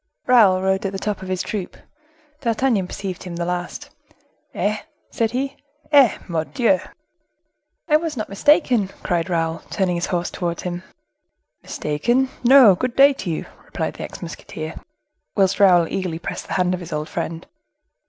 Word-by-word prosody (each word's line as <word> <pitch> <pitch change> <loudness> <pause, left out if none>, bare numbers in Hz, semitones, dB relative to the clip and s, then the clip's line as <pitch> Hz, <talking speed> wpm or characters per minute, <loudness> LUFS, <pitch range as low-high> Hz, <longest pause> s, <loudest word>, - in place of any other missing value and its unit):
Raoul 200 -7 +5
rode 190 0 +1
at 195 - -6
the - - -2
side 205 0 -3
of 190 - -7
his 185 -1 -1
troop; 200 -4 -5 0.6
D'Artagnan 230 -5 +1
perceived 190 -1 -5
him 180 -2 -7
the 170 0 -2
last. 175 0 -4 0.6
"Eh!" 210 +1 0 0.3
said 230 -4 0
he, 270 +4 -3 0.3
"Eh! 280 -6 +6
Mordioux!" 210 - +1 1.1
"I 305 -2 +5
was 315 -3 -4
not 215 - -3
mistaken!" 245 - +3 0.2
cried 175 0 0
Raoul, 165 -1 0
turning 190 -3 0
his 170 - -2
horse 175 -1 -2
towards 170 -2 -3
him. 175 -1 -4 0.8
"Mistaken—no! 240 - +4
Good 240 +7 -2
day 280 +1 +7
to 210 - -6
you," 160 - -3 0.2
replied - - -4
the - - -7
ex - - -8
musketeer; 155 0 -7 0.6
whilst 195 -1 +2
Raoul 180 -4 +6
eagerly 180 -3 -3
pressed 170 - -6
the - - -4
hand 180 0 +1
of 180 - -2
his 175 -2 -9
old 150 0 -2
friend. 165 0 -4
190 Hz, 160 wpm, -21 LUFS, 175-240 Hz, 1.1 s, day